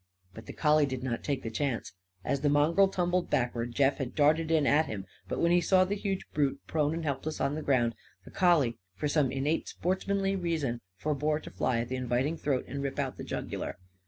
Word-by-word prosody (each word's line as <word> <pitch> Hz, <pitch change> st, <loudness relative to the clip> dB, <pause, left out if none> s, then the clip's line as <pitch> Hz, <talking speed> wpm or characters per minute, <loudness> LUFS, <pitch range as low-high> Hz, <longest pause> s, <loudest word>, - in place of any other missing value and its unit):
But 110 Hz, -, -11 dB
the -, -, -7 dB
collie 150 Hz, -1 st, +3 dB
did 130 Hz, -2 st, -4 dB
not 120 Hz, -3 st, -2 dB
take 140 Hz, -3 st, -2 dB
the 115 Hz, -, -4 dB
chance. 130 Hz, 0 st, -2 dB, 0.3 s
As 140 Hz, -, 0 dB
the 145 Hz, -, +2 dB
mongrel 155 Hz, +7 st, +4 dB
tumbled 180 Hz, -1 st, 0 dB
backward, 120 Hz, -1 st, -1 dB
Jeff 140 Hz, 0 st, +3 dB
had 130 Hz, -2 st, -4 dB
darted 155 Hz, +2 st, +3 dB
in 160 Hz, -3 st, +3 dB
at 150 Hz, +3 st, +4 dB
him. 100 Hz, -3 st, -5 dB, 0.2 s
But, -, -, -3 dB
when 170 Hz, -, +3 dB
he 175 Hz, 0 st, +5 dB
saw 185 Hz, +1 st, +4 dB
the 195 Hz, -, -2 dB
huge 195 Hz, -2 st, -2 dB
brute 145 Hz, -2 st, +1 dB
prone 155 Hz, 0 st, 0 dB
and 165 Hz, -, -4 dB
helpless 150 Hz, +1 st, -3 dB
on 140 Hz, -, +1 dB
the 155 Hz, -, -3 dB
ground, 120 Hz, -5 st, +2 dB, 0.3 s
the -, -, -12 dB
collie 155 Hz, -11 st, +3 dB, 0.2 s
for 150 Hz, -, -1 dB
some 145 Hz, -3 st, +2 dB
innate 140 Hz, +4 st, -1 dB
sportsmanly 195 Hz, +2 st, -1 dB
reason 160 Hz, -10 st, -1 dB, 0.2 s
forbore 150 Hz, +3 st, 0 dB
to -, -, -9 dB
fly 115 Hz, -2 st, 0 dB
at 120 Hz, -, -5 dB
the 130 Hz, -, -2 dB
inviting 125 Hz, +5 st, 0 dB
throat 140 Hz, -5 st, -1 dB
and 140 Hz, +1 st, -4 dB
rip 135 Hz, -1 st, -3 dB
out 135 Hz, -3 st, -2 dB
the -, -, -6 dB
jugular. -, -, -4 dB
145 Hz, 215 wpm, -30 LUFS, 130-165 Hz, 0.3 s, he